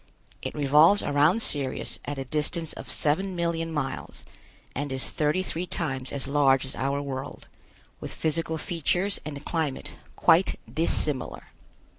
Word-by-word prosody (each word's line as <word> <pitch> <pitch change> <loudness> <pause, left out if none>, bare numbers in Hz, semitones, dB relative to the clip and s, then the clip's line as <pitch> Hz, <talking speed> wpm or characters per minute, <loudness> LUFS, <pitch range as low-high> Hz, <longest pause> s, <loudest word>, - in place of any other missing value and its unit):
It - - -5
revolves 150 +7 +5
around 150 +10 +3
Sirius 140 -3 0
at 145 - -4
a 135 - -4
distance 155 +4 -2
of - - -8
seven 185 +6 +1
million 170 -1 -1
miles 145 -4 -4 0.5
and 145 +1 -3
is 130 0 0
thirty 155 +5 +1
three 180 0 -3
times 135 -7 -2
as 140 -1 -2
large 140 -2 +3
as 130 - -6
our 140 +1 -1
world, 135 -1 -6 0.5
with - - -6
physical 160 +1 -1
features 175 +5 0
and 150 -1 -6
climate 160 -5 -2 0.2
quite 175 +4 +4
dissimilar. 150 -4 0
150 Hz, 140 wpm, -27 LUFS, 140-165 Hz, 0.5 s, revolves